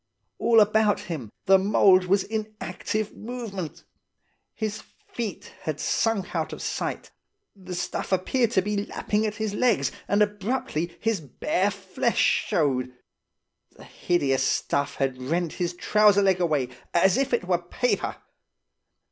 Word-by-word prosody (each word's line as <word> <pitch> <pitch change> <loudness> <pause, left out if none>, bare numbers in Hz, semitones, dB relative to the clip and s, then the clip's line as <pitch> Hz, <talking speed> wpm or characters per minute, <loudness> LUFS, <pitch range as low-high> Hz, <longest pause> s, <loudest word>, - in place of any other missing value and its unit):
All 230 -1 +5
about 215 0 +3
him 150 -11 -6 0.2
the 195 -1 +6
mould 190 -1 +5
was 195 +1 +2
in 215 0 -4
active 215 -1 -3
movement. 215 -8 -6 0.7
His 215 -2 -3 0.2
feet 225 -6 -5
had 155 -2 -3
sunk 225 -5 0
out - - -1
of - - -7
sight. - - -4 0.4
The 185 -2 -8
stuff 175 - -3
appeared 225 +6 +2
to 190 - +3
be 205 0 -1
lapping 215 +1 -1
at 210 - -4
his 220 -2 -3
legs 235 0 +2 0.2
and 205 +2 +4
abruptly 205 -5 -2
his 225 -5 0
bare 180 +7 0
flesh 200 +4 +1
showed. 130 - 0 0.8
The - - -13
hideous 140 -7 0
stuff 140 +1 0
had 130 -2 -2
rent 165 +5 -1
his 175 -1 -2
trouser 210 +1 +4
leg 190 -2 +3
away 150 -7 +1 0.3
as 185 +2 +5
if 275 0 0
it 240 -6 +1
were 175 -1 +1
paper. 210 +8 -1
195 Hz, 140 wpm, -25 LUFS, 175-215 Hz, 0.8 s, the